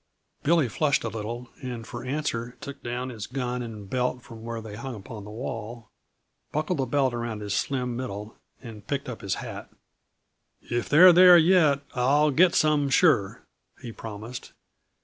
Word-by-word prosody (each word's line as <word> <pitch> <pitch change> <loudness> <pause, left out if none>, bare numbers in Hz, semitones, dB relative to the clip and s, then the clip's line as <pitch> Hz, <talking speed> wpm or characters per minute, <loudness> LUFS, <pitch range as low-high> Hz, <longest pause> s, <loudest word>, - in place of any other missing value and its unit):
Billy 160 -3 +3
flushed 140 +5 +1
a 115 - -2
little, 115 +3 -6
and 120 -3 -6
for 120 - -7
answer 125 -3 -3
took 140 -1 -9
down 120 +2 -4
his 110 -5 -7
gun 125 -1 -3
and 110 -4 -7
belt 125 +2 -1
from 115 -3 -11
where 115 0 -5
they 110 -2 -8
hung 130 +3 -6
upon 105 +1 -9
the - - -9
wall, 115 0 -7 0.6
buckled 155 +2 -1
the 130 - 0
belt 135 0 +1
around 120 -2 -4
his 105 -1 -3
slim 125 +1 -1
middle 110 -4 -6 0.3
and 110 -4 -10
picked 140 -1 -2
up 125 -3 -6
his 100 - -2
hat. - - -7 0.9
"If 120 0 -3
they're 175 +4 +8
there 180 0 +9
yet, 160 -5 +4
I'll 145 +4 +3
get 175 +5 +4
some, 150 -2 +3
sure," 140 - +3 0.4
he 120 - -8
promised. 110 +2 -8
125 Hz, 170 wpm, -26 LUFS, 115-140 Hz, 0.9 s, there